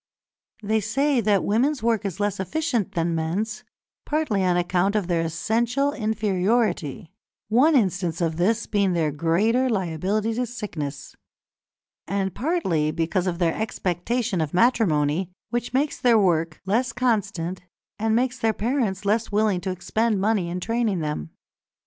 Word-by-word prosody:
They 220 +2 +1
say 260 +5 +1
that 205 -2 +2
women's 250 +5 +1
work 230 -2 +1
is 195 -1 -4
less 205 -1 -1
efficient 235 - -1
than 170 0 0
men's, 205 +10 -2 0.4
partly 295 -11 0
on 180 -1 +2
account 180 +3 +1
of 210 -3 +1
their 170 -1 0
essential 230 - 0
inferiority 205 - 0 0.4
(one 270 +8 +4
instance 185 - +1
of 165 -2 -1
this 220 +6 +1
being 200 -3 +1
their 160 -3 +1
greater 205 - +2
liability 200 +2 -1
to 245 +2 -1
sickness), 155 - -6 0.9
and 195 -2 -1
partly 210 - 0
because 165 +4 -1
of 175 -2 -1
their 170 -2 +1
expectation 205 -1 -1
of 155 +1 -3
matrimony, 180 - +2 0.2
which 240 0 -2
makes 280 +4 0
their 240 -2 +4
work 165 -5 +1
less 230 +6 +1
constant 200 -8 -1 0.4
and 220 +1 +1
makes 250 +1 0
their 225 -1 +2
parents 215 -4 -1
less 215 +2 +1
willing 205 -3 +2
to 190 - -3
expend 205 +4 0
money 200 -3 +1
in 180 +1 -3
training 225 -3 0
them. 150 - -3
205 Hz, 145 wpm, -24 LUFS, 175-230 Hz, 0.9 s, one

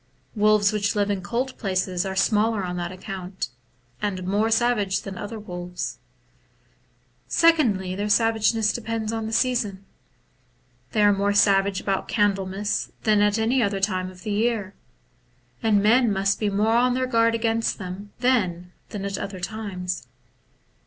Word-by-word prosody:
Wolves 210 0 +4
which 210 +1 0
live 205 0 +1
in 195 -2 -2
cold 245 +9 -2
places 185 -2 -1
are 190 - -4
smaller 215 +1 +2
on 180 -1 -3
that 175 0 -3
account, 185 - -6 0.5
and 190 -3 -2
more 205 +4 +1
savage 225 -4 +1
than 195 -1 -6
other 210 +4 -6
wolves. 180 -3 -6 1.3
Secondly, 235 - +3
their 205 +2 -2
savageness 225 0 +2
depends 225 -1 -3
on 225 -1 -3
the - - -5
season; 225 -5 0 1.1
they 215 -2 +3
are 205 0 +6
more 200 +1 +1
savage 195 -1 +3
about 195 -1 -2
Candlemas 200 -1 0
than 210 -2 +3
at 205 +1 +3
any 235 +4 +2
other 200 -3 0
time 185 -2 -1
of 185 -1 -14
the 215 - -3
year, 215 -2 0 0.9
and 210 -3 +3
men 235 +2 +4
must 195 0 +1
be 210 - +1
more 215 +3 +2
on 250 +1 +3
their 255 0 0
guard 230 -2 +2
against 225 0 0
them 195 +1 -7
then 185 -9 +1 0.2
than 200 -2 -5
at 200 -1 -3
other 195 -2 -5
times. 185 -2 -5
205 Hz, 150 wpm, -24 LUFS, 190-225 Hz, 1.3 s, are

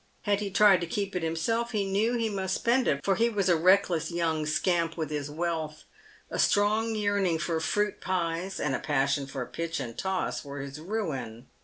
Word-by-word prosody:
Had 205 -1 +1
he 205 -1 -3
tried 200 -2 +5
to 170 - -3
keep 200 +2 -3
it 180 - 0
himself, 225 +10 -1
he 205 -2 +1
knew 210 +5 +1
he 230 -1 0
must 190 -3 -2
spend 245 +2 +2
it, 140 -1 0
for 195 - +3
he 230 +4 +2
was 200 -4 0
a 175 - +5
reckless 180 -1 +3
young 165 -3 -1
scamp 165 +1 +1
with 155 -2 -3
his 145 -1 -3
wealth; 160 -1 -3 0.5
a - - -3
strong 215 +2 +2
yearning 200 -5 +1
for 165 0 -1
fruit 205 +5 -1
pies 180 0 -2
and 150 - 0
a - - 0
passion 140 -1 0
for 135 -2 -4
pitch 165 +3 -4
and 120 -4 -6
toss 190 -1 -2
were 140 0 -7
his 140 +1 -7
ruin. 155 - -4
175 Hz, 200 wpm, -28 LUFS, 155-205 Hz, 0.5 s, tried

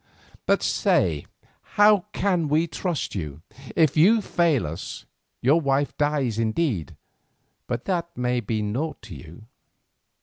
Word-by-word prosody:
But - - +2
say, 80 -5 +1 0.5
how 205 -2 +6
can 180 -7 0
we 155 +3 +2
trust 170 -1 -3
you? 75 -5 -6 0.3
If 155 -4 +3
you 195 +9 +5
fail 170 - +1
us 80 +2 -7 0.4
your 145 +7 +4
wife 140 0 0
dies 145 -7 0
indeed, 110 - -1 0.7
but 120 -1 -3
that 170 -2 -2
may 125 0 0
be 110 -1 -2
naught 130 +10 -3
to - - -9
you." 85 +5 -12
140 Hz, 130 wpm, -24 LUFS, 110-170 Hz, 0.7 s, how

